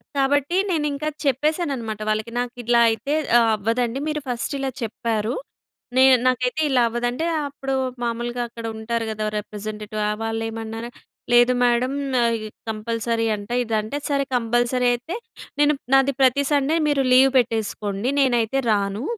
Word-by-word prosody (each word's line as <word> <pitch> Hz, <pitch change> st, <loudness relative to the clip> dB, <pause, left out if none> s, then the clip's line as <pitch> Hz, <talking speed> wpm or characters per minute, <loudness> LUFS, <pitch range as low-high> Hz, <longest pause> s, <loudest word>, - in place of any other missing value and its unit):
కాబట్టి 285 Hz, +4 st, +1 dB, 0.2 s
నేను 315 Hz, -4 st, 0 dB
ఇంకా 295 Hz, +2 st, -4 dB, 0.2 s
చెప్పేసాననమాట 275 Hz, -, -1 dB
వాళ్ళకి. 215 Hz, +2 st, -1 dB
నాకు 245 Hz, 0 st, -3 dB
ఇట్లా 235 Hz, +1 st, +3 dB
అయితే 225 Hz, +6 st, -2 dB, 0.3 s
ఆహ్, 230 Hz, -1 st, +3 dB
అవ్వదండి. 230 Hz, +4 st, -1 dB
మీరు 305 Hz, -1 st, -2 dB
ఫస్ట్ 245 Hz, +4 st, -2 dB
ఇలా 270 Hz, 0 st, -1 dB
చెప్పారు. 225 Hz, 0 st, -2 dB, 0.6 s
నేను 260 Hz, 0 st, +7 dB
నాకైతే 255 Hz, +4 st, +1 dB
ఇలా 260 Hz, -3 st, +3 dB
అవ్వదంటే. 245 Hz, +6 st, -2 dB, 0.2 s
అప్పుడు 270 Hz, -1 st, -4 dB, 0.3 s
మామూలుగా 240 Hz, +1 st, -2 dB
అక్కడ 230 Hz, 0 st, -8 dB
ఉంటారు 230 Hz, +1 st, -2 dB
కదా! 215 Hz, 0 st, -3 dB
రిప్రజెంటేటివ్. 215 Hz, 0 st, -6 dB
ఆ -, -, +1 dB
వాళ్ళేమన్నార. 225 Hz, 0 st, -4 dB, 0.5 s
లేదు 240 Hz, +1 st, +6 dB
మేడం. 245 Hz, +2 st, +2 dB, 0.8 s
కంపల్సరీ 225 Hz, +1 st, -1 dB
అంట 205 Hz, 0 st, -9 dB
ఇదంటే. 220 Hz, +3 st, -2 dB
సరే 280 Hz, -1 st, +1 dB
కంపల్సరీ 240 Hz, +1 st, +1 dB
అయితే 245 Hz, +9 st, -5 dB, 0.4 s
నేను 295 Hz, 0 st, +5 dB, 0.2 s
నాది 270 Hz, +1 st, +5 dB
ప్రతి 265 Hz, +2 st, +4 dB
సండే 290 Hz, +2 st, +2 dB
మీరు 290 Hz, -2 st, +2 dB
లీవ్ 265 Hz, +1 st, +7 dB
పెట్టేసుకోండి. 220 Hz, -2 st, -1 dB
నేనైతే 250 Hz, -1 st, +2 dB
రాను. 200 Hz, +1 st, 0 dB
240 Hz, 135 wpm, -22 LUFS, 225-270 Hz, 0.8 s, నేను